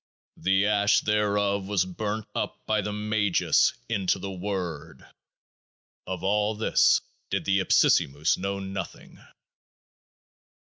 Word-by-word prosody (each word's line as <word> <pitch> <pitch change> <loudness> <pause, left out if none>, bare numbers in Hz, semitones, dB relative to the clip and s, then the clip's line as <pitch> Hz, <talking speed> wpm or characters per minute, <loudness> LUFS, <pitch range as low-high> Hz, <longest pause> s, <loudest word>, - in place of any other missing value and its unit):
The 95 +1 +2
Ash 105 0 +3
thereof 100 -2 0
was 100 -3 +1
burnt 105 +3 -4
up - - -4
by 110 -1 +1
the 105 - -4
Magus 105 -2 +1
into 100 -5 0
The 95 +1 -6
Word. 90 -5 -5 1.0
Of 95 -1 -5
all 105 +2 +1
this 110 - +3 0.3
did - - -2
the 95 0 +2
Ipsissimus 75 -4 +3
know 100 +1 -3
Nothing. 95 0 -7
100 Hz, 115 wpm, -26 LUFS, 95-105 Hz, 1.0 s, Ash